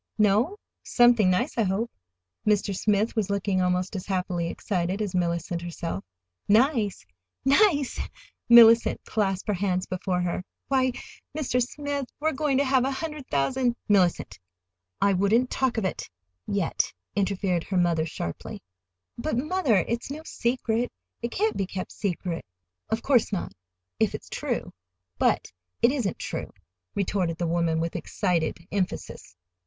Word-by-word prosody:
"No? 215 - +3 0.2
Something 240 -5 +5
nice, 235 +8 0
I - - +5
hope." 210 +3 0 0.5
Mr. 205 -1 +2
Smith 210 +3 +1
was 210 -3 0
looking 200 -1 0
almost 180 +2 0
as 185 - -5
happily 180 -3 -1
excited 180 +1 -2
as 205 -3 -2
Mellicent 170 -1 -1
herself. 170 - -4 0.4
"Nice—NICE!" 240 - +2 0.5
Mellicent 230 -1 +8
clasped 195 -3 -1
her 210 - +2
hands 185 -1 0
before 185 0 -2
her. 180 +1 -2 0.3
"Why, 260 -2 +2 0.4
Mr. 255 -4 +1
Smith, 285 +2 -3
we 305 - 0
are - - -3
going 275 -1 +1
to 280 - +4
have 260 -2 +3
a 265 - +1
hundred 300 0 -5
thousand—" 240 - +1
"Mellicent, 185 - +2 0.6
I 200 - +3
wouldn't 215 +7 +2
talk 260 -3 0
of 220 - 0
it—yet," 90 - -3 0.2
interfered 190 -3 0
her 190 - -1
mother 170 -2 +2
sharply. 85 - -6 0.6
"But, 300 -1 -1
mother, 275 - +2
it's 235 +2 -2
no 300 +3 -6
secret. 235 -2 -1 0.3
It 235 - -2
can't 430 - 0
be 195 - -1
kept 185 0 -5
secret!" 180 -4 -3 0.5
"Of 225 +1 -1
course 250 -7 +3
not—if 90 - -4
it's - - -9
true. - - -3 0.5
But - - +2 0.3
it 235 - +6
isn't 245 -10 -1
true," - - -5 0.4
retorted 185 -4 0
the 175 - -1
woman, 165 -1 +1
with 165 0 -2
excited 170 -3 -1
emphasis. 185 - -3
200 Hz, 140 wpm, -26 LUFS, 180-245 Hz, 0.6 s, Mellicent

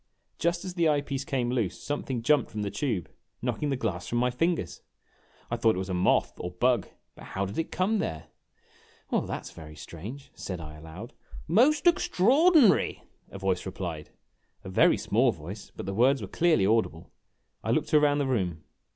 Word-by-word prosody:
Just 170 +2 0
as 185 - -5
the 170 -3 +2
eye 145 -1 +2
piece 140 -1 -4
came 130 -5 -1
loose 115 -9 -1
something 135 -5 -3
jumped 150 +4 +3
from 105 -1 -4
the 100 - -3
tube, 115 - -2 0.3
knocking 125 +4 -2
the 135 - +1
glass 100 -8 -3
from 120 - -1
my 125 +1 +2
fingers. 165 - -1 0.7
I 120 - 0
thought 115 -2 +3
it - - -4
was 95 0 -3
a - - -1
moth 90 0 +2
or 90 - -4
bug 120 +4 +1 0.3
but - - -13
how 100 +1 -3
did 100 +7 -5
it 165 - -2
come 205 +4 +1
there? 80 - -3 0.9
"Well, - - +2
that - - -5
's - - -8
very 75 -2 -11
strange," 105 - -9
said 90 -3 -6
I, 75 -1 -8
aloud. 80 +8 -10 0.3
"Most 260 - +4
extraordinary," 300 - +4 0.3
a - - -9
voice 95 -2 -1
replied; 85 -5 -5 0.5
a - - -7
very 95 - +4
small - - +2
voice, 95 +7 -9
but - - -6
the 95 - -3
words 130 +6 +4
were - - -5
clearly 160 - +2
audible. 110 -6 0 0.5
I - - -3
looked - - 0
around 150 -1 +5
the 145 - +1
room. 90 -11 -1
120 Hz, 190 wpm, -28 LUFS, 95-150 Hz, 0.9 s, around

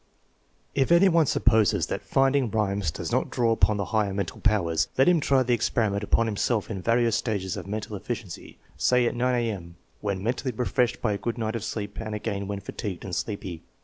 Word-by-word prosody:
If 135 +3 +1
any 175 +3 +6
one 165 -4 +3
supposes 110 -6 +3
that - - -4
rinding 135 -2 +3
rhymes 100 -5 0
does - - -5
not - - +1
draw 115 -2 +1
upon 110 -2 +3
the 100 - -1
higher 105 -3 +1
mental 100 -3 -4
powers, 95 -7 +2
let 135 - +5
him 175 -2 +5
try 135 -3 +3
the 125 0 +1
experiment 110 -3 0
upon 115 +2 +2
himself 110 0 -1
in 95 -4 -4
various 115 +1 +2
stages 100 -6 -2
of - - -7
mental 105 +1 -4
efficiency, 105 -2 -6 0.2
say 125 -1 +3
at - - +1
9 125 +1 +1
A.M., 100 -8 -3 0.2
when 100 -2 -3
mentally 125 +3 -1
refreshed 125 -1 0
by 105 -3 +2
a 100 - -3
good 120 0 -3
night 110 -1 -2
of 115 - -3
sleep 105 -2 -5
and 110 -1 -4
again 100 -2 -3
when 100 0 -4
fatigued 100 -2 -6
and 90 -3 -4
sleepy. 95 -6 -4
110 Hz, 205 wpm, -26 LUFS, 100-120 Hz, 0.2 s, any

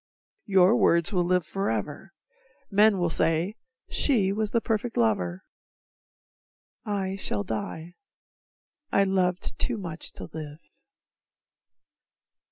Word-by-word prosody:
Your 190 +2 +5
words 170 -6 +3
will 180 -2 +2
live 180 -1 +1
forever, 155 - -3 0.6
men 205 0 +5
will 175 -2 +1
say 165 +5 +2 0.3
"She 205 -9 +3
was 215 0 -1
the 230 - +1
perfect 225 +1 -2
lover" 95 -6 0 1.4
I 195 -2 -2
shall 105 - -1
die, 160 +11 -5 1.0
I 200 - +4
loved 185 -1 -1
too 245 -3 0
much 170 -5 -5
to - - -8
live. 150 -2 -7
185 Hz, 105 wpm, -26 LUFS, 160-200 Hz, 1.4 s, Your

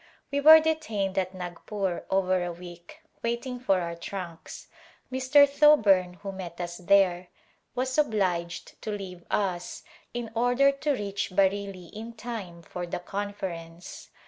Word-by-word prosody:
We 285 0 0
were 315 +2 +10
detained 225 -12 -1
at 185 0 -3
Nagpur 180 +1 -4
over 185 -1 +2
a 175 - -3
week 175 0 -12 0.2
waiting 240 +2 -3
for 195 -7 +2
our 170 -1 -3
trunks. 170 -1 -7 0.4
Mr. 260 +3 +5
Thoburn, 215 -12 +5
who 195 - -4
met 180 -3 -8
us 175 -1 -4
there, 185 -1 +3 0.5
was 255 +1 -1
obliged 185 - -1
to - - -5
leave 190 -4 -6
us 180 -4 -2 0.3
in 240 -2 -5
order 245 +4 +4
to 285 +1 -1
reach 200 -4 -3
Bareilly 195 -2 0
in 225 +2 -7
time 210 -7 -7
for 175 +1 -6
the - - -3
conference. 175 -3 -6
195 Hz, 140 wpm, -27 LUFS, 180-235 Hz, 0.5 s, were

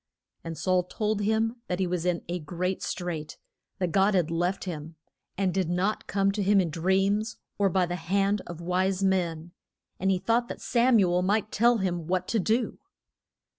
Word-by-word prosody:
And 165 -1 -6
Saul 185 -1 +2
told 210 +2 -1
him 220 +3 +1
that 180 - -1
he 190 - +1
was 180 -1 -2
in 175 -1 0
a 175 +1 -2
great 180 +4 -3
strait, 170 -4 -4 0.4
that 180 -3 -1
God 195 +3 +3
had 170 -3 +1
left 175 +3 0
him, 160 -3 -6 0.4
and 190 -2 +1
did 190 -3 0
not 185 +5 -1
come 195 0 +2
to 205 +1 -2
him 200 +1 +4
in 175 -4 0
dreams 195 +6 +1 0.2
or 200 -1 +4
by 185 -1 +2
the 175 +1 -3
hand 195 +4 +1
of 175 -2 -7
wise 185 +2 0
men, 175 -3 0 0.5
and 190 - +1
he 190 - +3
thought 230 +5 +1
that - - -7
Sam 240 0 +3
u 185 -4 +3
el 180 - +2
might 205 +3 +1
tell 235 +2 +4
him 175 -5 -2
what 185 0 0
to 225 - +1
do. 225 +5 0
185 Hz, 195 wpm, -27 LUFS, 175-200 Hz, 0.5 s, him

